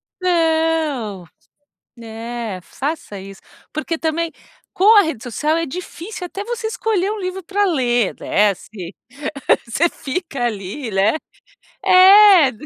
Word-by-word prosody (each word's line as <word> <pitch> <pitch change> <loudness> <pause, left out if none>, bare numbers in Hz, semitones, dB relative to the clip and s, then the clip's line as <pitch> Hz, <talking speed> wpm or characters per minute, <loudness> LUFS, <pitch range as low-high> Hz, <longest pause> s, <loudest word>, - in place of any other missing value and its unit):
Então, 320 - 0 0.7
né, 230 -3 -6
faça 285 - -5
isso, 195 0 -11 0.3
porque 315 +2 -3
também, 325 +1 -1 0.4
com 420 +4 +5
a 405 - +8
rede 315 -9 -4
social 300 +6 -1
é 330 0 -1
difícil 360 +5 -7
até 390 +3 -6
você 470 0 -4
escolher 440 -4 -1
um 435 - -3
livro 370 0 -4
para 405 +3 0
ler, 245 - +1
desce. 200 -2 -1 0.7
Você 310 +9 +1
fica 275 -4 -4
ali, 215 +3 -4
né, 195 +5 +2 0.7
é. 375 -5 +8
320 Hz, 120 wpm, -19 LUFS, 230-365 Hz, 0.7 s, a